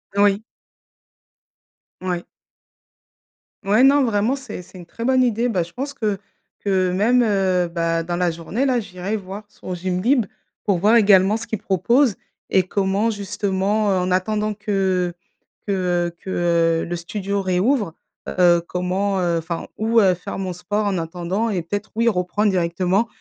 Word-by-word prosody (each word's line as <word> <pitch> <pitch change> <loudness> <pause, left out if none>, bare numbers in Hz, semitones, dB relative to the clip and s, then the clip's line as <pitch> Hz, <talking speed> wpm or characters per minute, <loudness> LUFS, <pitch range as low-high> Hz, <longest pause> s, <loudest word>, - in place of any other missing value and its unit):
Oui. 200 0 +3 1.6
Ouais. 180 -2 -3 1.4
Ouais, 210 +5 +4
non, 280 +1 +6
vraiment, 225 +2 +1
c'est 265 -9 -8
c'est 180 - -15
une 175 - -10
très 230 +7 -7
bonne 260 0 +4
idée. 240 0 +1
Bah, 185 -6 +1
je 170 - -12
pense 280 +3 -4
que 215 -7 -1 0.4
que 185 -2 +1
même, 235 +7 +3
heu, 190 -4 +2
bah, 165 -1 -1
dans 175 +1 -3
la 180 0 +1
journée, 170 - -2
là, 255 -3 +2
j'irai 200 0 -4
voir 195 +1 -8
sur 185 - -8
Gymlib 190 +8 +1 0.4
pour 200 -3 +1
voir 210 +6 +4
également 205 -1 +5
ce 235 - -8
qu'ils 220 - -3
proposent 230 +4 +2 0.3
et 190 - +3
comment 195 +3 0
justement, 205 0 0
heu, 190 - +2
en 180 0 -1
attendant 210 +3 0
que 190 -4 0 0.5
que, - - 0
heu 175 -2 0
que, - - -8 0.5
heu, - - -4
le 175 - -3
studio 200 +3 -3
réouvre, 190 - +1 0.3
heu, 175 -2 +4
comment, 190 +2 -1
heu 175 -2 +1
enfin, 165 +1 -5
où, 225 +1 +3
heu, 190 -3 +5
faire 180 +1 -7
mon 185 -2 -3
sport 205 +4 -2
en 200 -2 0
attendant, 180 +7 -2
et 185 -5 -1
peut-être, 205 +5 -4
oui, 230 +1 +2
reprendre 205 +1 +1
directement, 185 +4 +1
195 Hz, 165 wpm, -21 LUFS, 180-215 Hz, 1.6 s, non